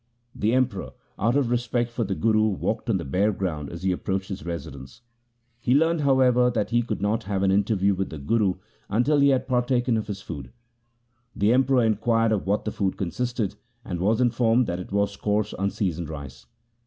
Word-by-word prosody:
The 110 +3 0
Emperor, 130 -7 -1 0.3
out 115 +5 +2
of 130 -4 +1
respect 120 0 0
for 120 0 -2
the 95 -2 -2
Guru, 110 0 +2
walked 100 -4 -2
on - - +3
the - - -5
bare 95 +10 +1
ground 80 -7 -3
as 85 +1 -8
he 95 - +2
approached 95 +1 -2
his 95 0 -5
residence. 70 - -7 0.6
He 125 +2 +2
learned, 165 +2 +3
however, 130 -3 +4
that 110 -3 -2
he 120 0 +3
could 110 -3 -4
not 110 +2 0
have 100 -1 -1
an 95 - +3
interview 100 0 +2
with 95 0 -2
the 80 - -7
Guru 95 +6 +1 0.3
until 130 +7 +2
he 140 0 +5
had 130 -1 +1
par 125 -2 +2
taken 120 -1 +1
of 110 - -3
his 100 -2 -6
food. 70 -6 -7 0.8
The 105 +3 +3
Emperor 130 -1 +3
inquired 115 +1 +2
of 105 -3 -1
what 100 +2 0
the 110 - -1
food 95 -3 -1
consisted, 115 +2 -2 0.3
and 90 -2 -4
was 105 +5 +2
informed 120 0 +3
that 90 -3 -3
it 90 - -8
was 100 0 0
coarse 105 +1 -1
unseasoned 90 -4 -2
rice. 70 -4 -9
105 Hz, 200 wpm, -25 LUFS, 95-120 Hz, 0.8 s, he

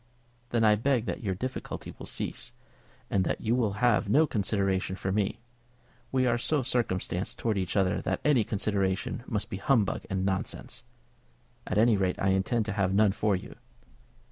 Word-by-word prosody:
"Then 120 -1 +1
I 105 -1 +6
beg 120 +1 +1
that - - -3
your 95 -5 -1
difficulty 130 +7 -5
will - - -9
cease, - - -4 0.6
and 95 - +3
that - - -1
you 115 +1 0
will 115 -5 +1
have 110 -4 +3
no 150 +9 +5
consideration 100 -6 0
for 95 0 -3
me. 100 +2 -1 0.7
We 130 -1 +2
are 120 -1 +2
so 145 +3 +1
circumstanced 95 -6 -1
towards 110 -4 0
each 95 +1 -2
other 95 0 +2
that - - -1
any 140 -6 +4
consideration 100 0 -1
must 105 -3 -2
be - - -3
humbug 110 0 +1
and 95 0 -1
nonsense. 95 -1 -3 0.9
At 95 - -1
any 110 0 +5
rate, 95 -2 +1
I 95 - +1
intend 95 +4 +1
to 110 - -3
have 95 -2 +1
none 105 -1 +5
for 105 0 +1
you. 90 - -7
105 Hz, 175 wpm, -29 LUFS, 95-120 Hz, 0.9 s, I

